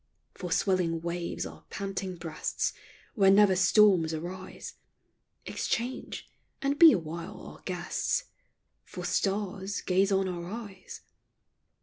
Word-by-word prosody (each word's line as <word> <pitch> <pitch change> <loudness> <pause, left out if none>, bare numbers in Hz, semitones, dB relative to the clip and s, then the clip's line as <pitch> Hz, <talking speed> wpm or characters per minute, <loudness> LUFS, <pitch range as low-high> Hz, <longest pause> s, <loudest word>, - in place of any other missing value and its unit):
For 180 -2 -6
swelling 170 -3 +1
waves 170 0 -3
our - - -10
panting 195 -1 -4
breasts, 165 -2 -2 0.4
Where 195 -6 +5
never 195 -1 +6
storms 180 -3 +5
arise, 185 +4 -7 0.7
Exchange; 245 +2 -3 0.3
and 280 +2 -1
be 330 -2 +11
awhile 170 - -3
our - - -11
guests: 180 - -1 0.6
For - - -7
stars, 195 0 -1
gaze 195 +2 +2
on 195 -1 +2
our 175 -2 -4
eyes. 205 -4 -8
190 Hz, 110 wpm, -29 LUFS, 175-200 Hz, 0.7 s, be